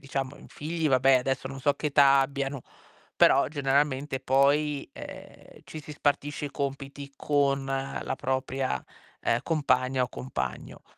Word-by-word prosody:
diciamo 135 0 -4
in - - -14
figli, 160 +1 -2
vabbè 130 0 +5
adesso 135 +1 -2
non 135 0 -8
so 145 +2 +2
che - - -3
età 140 -1 +6
abbiano, 135 -1 -2 0.5
però - - +5
generalmente 140 -1 0
poi, 140 +2 +2
ehm, - - -11
ci 155 - -8
si 150 0 -9
spartisce 145 0 -1
i - - -7
compiti 140 0 -5
con 140 -2 +1
la 135 0 -3
propria, 130 - -2 0.4
ehm, - - +1
compagna 130 -4 +1
o 125 - -1
compagno. 65 - -5
140 Hz, 140 wpm, -27 LUFS, 135-145 Hz, 0.5 s, età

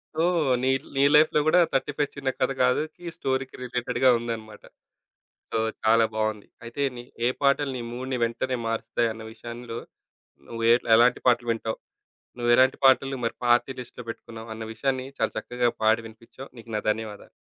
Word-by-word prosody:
So, 160 - 0 0.4
నీ 130 - +1
ల్ - - -19
నీ 135 - +2
లైఫ్‌లో 150 0 +5
కూడా 170 +3 +5
'35 145 +2 -1
చిన్న 140 -1 -2
కథ 130 - +1
కాదుకి' 155 +7 0
స్టోరీకి 130 -3 -2
రిలేటెడ్‌గా 125 +1 +1
ఉందనమాట. 110 -2 -6 0.9
సో, 115 - 0 0.2
చాలా 115 +1 +5
బావుంది. 110 -1 -2 0.2
అయితే 120 +4 -6
నీ 120 - -8 0.2
ఏ - - +3
పాటలు 140 0 +2
నీ - - -5
మూడ్‌ని 130 +1 -3
వెంటనే 125 +2 -1
మారుస్తాయి 115 0 -1
అన్న 110 0 -10
విషయంలో 115 +1 -7 0.7
నువ్వు 115 0 -5
ఏ - - +8 0.2
ఎలాంటి 120 +2 +5
పాటలు 120 -1 +3
వింటావు? 115 -1 -3 0.6
నువ్వెలాంటి 120 +2 +4
పాటలు 135 0 +4
మరి 115 - -2
పార్టీ 120 +2 +3
లిస్ట్‌లో 125 0 -11
పెట్టుకున్నావు 115 0 -8
అన్న 110 - -6
విషయాన్ని 130 +2 -2
చాలా - - 0
చక్కగా 125 0 0
పాడి 110 +1 +3
వినిపించావు. 115 +4 -13
నీకు 115 0 -12
నా - - -2
ధన్యవాదాలు. 105 -1 -6
120 Hz, 160 wpm, -26 LUFS, 115-130 Hz, 0.9 s, ఏ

